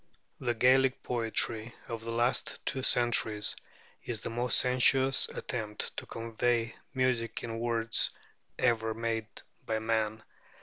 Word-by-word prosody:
The 120 -2 -1
Gaelic 130 +2 +4
poetry 115 -1 0
of 115 -1 -5
the 115 - -6
last 120 +2 -1
two 130 - -1
centuries 115 -4 +2 0.5
is 115 -3 -4
the - - -4
most 120 +1 +2
sensuous 130 +1 +4
attempt 110 -4 -4
to - - -5
convey 115 0 -1 0.2
music 130 -3 0
in 115 -1 -4
words 115 -1 +2 0.5
ever 110 -2 +1
made 115 -1 -2 0.4
by 110 - -1
man. 110 -1 -1
115 Hz, 125 wpm, -30 LUFS, 110-125 Hz, 0.5 s, Gaelic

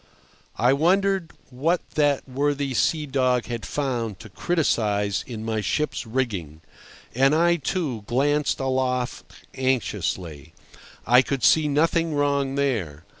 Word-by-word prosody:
I 125 +3 +4
wondered 185 +3 +2 0.2
what 160 +8 -1
that 145 -3 +1
worthy 140 +1 -1
sea 155 +4 +1
dog 130 -3 +1
had 120 -3 -5
found 120 -8 -2
to 110 - -11
criticise 105 - 0
in 110 -3 -6
my 110 -1 -1
ship's 120 +6 -2
rigging. 100 - -3 0.5
And 135 +4 +3
I, 170 +1 +3
too, 150 - -2
glanced 145 +4 +1
aloft 130 -1 -2 0.2
anxiously. 95 - -2 0.5
I 125 +2 +6
could 135 -2 -3
see 155 -1 +5
nothing 165 +2 +1
wrong 140 -1 0
there. 105 - -2
130 Hz, 125 wpm, -24 LUFS, 115-145 Hz, 0.5 s, I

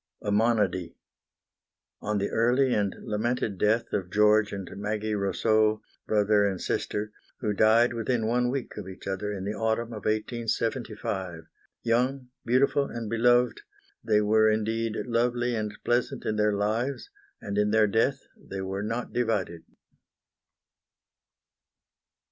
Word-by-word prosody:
A 105 - -1
MONODY 100 -6 +1 1.1
On 105 0 -1
the 100 0 -1
early 125 +3 +3
and 100 -2 0
lamented 110 -2 -2
death 110 +2 +1
of 95 -3 -1
George 105 +1 +4
and 100 -2 -5
Maggie 105 +2 -2
Rosseaux, 110 +2 +1 0.2
brother 105 -1 +3
and 95 -3 0
sister, 105 +1 -2 0.3
who 105 -4 0
died 110 +4 +4
within 115 0 -1
one 125 +2 +1
week 135 0 -4
of 100 -3 -6
each 95 - -11
other 100 +2 -3
in 100 -2 -5
the 105 - -2
autumn 110 +1 -1
of 105 -2 -8
1875. 110 -5 -2 0.4
Young, 125 +3 0
beautiful 135 +3 +2
and 115 -4 -6
beloved, 120 +1 +3 0.4
they 105 -2 +3
were 110 +1 +4
indeed 110 +1 -1
lovely 120 +1 0
and 105 -1 -3
pleasant 120 +2 0
in 110 - 0
their 105 0 +2
lives, 115 - -2 0.3
and 100 0 -3
in 105 0 +2
their 110 0 +4
death 115 +6 +1
they 95 0 -7
were 95 +1 -3
not 115 +4 -3
divided. 105 -8 -1
110 Hz, 135 wpm, -27 LUFS, 105-120 Hz, 1.1 s, George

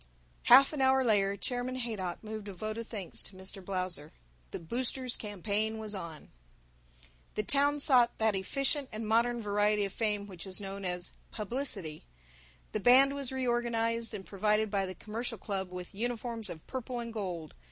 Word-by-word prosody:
Half 275 +2 +8
an 290 - -1
hour 265 0 +5
later 200 -4 +3
Chairman 245 +4 -2
Haydock 215 -9 -3
moved 215 -1 -6
a 200 - -5
vote 215 +4 -4
of 230 - -5
thanks 200 -6 -5
to 195 - -9
Mr. 190 +1 -7
Blausser. 180 -5 -2 0.4
The - - -4
boosters' 250 +7 0
campaign 210 +1 -1
was 215 -1 -3
on. 170 -5 -7 1.1
The 210 - 0
town 285 +5 +3
sought 250 -4 +4
that 220 -2 +2
efficient 275 +8 0
and 215 0 -4
modern 235 +1 +2
variety 205 0 +2
of 195 - -5
fame 210 -3 0
which 190 -2 -7
is 185 +1 -1
known 195 -1 -5
as 180 0 -3 0.2
"publicity." 210 - -3 0.7
The - - -1
band 260 +5 +7
was 280 -2 -2
reorganized, 235 -3 0
and 190 -2 -7
provided 210 +1 +1
by 195 -2 +1
the 185 - -6
Commercial 225 +5 -4
Club 190 -1 -3
with 180 +1 -7
uniforms 230 0 -3
of 160 -3 -8
purple 255 -1 -4
and 230 -1 -5
gold. 180 -8 -4
215 Hz, 170 wpm, -32 LUFS, 195-240 Hz, 1.1 s, Half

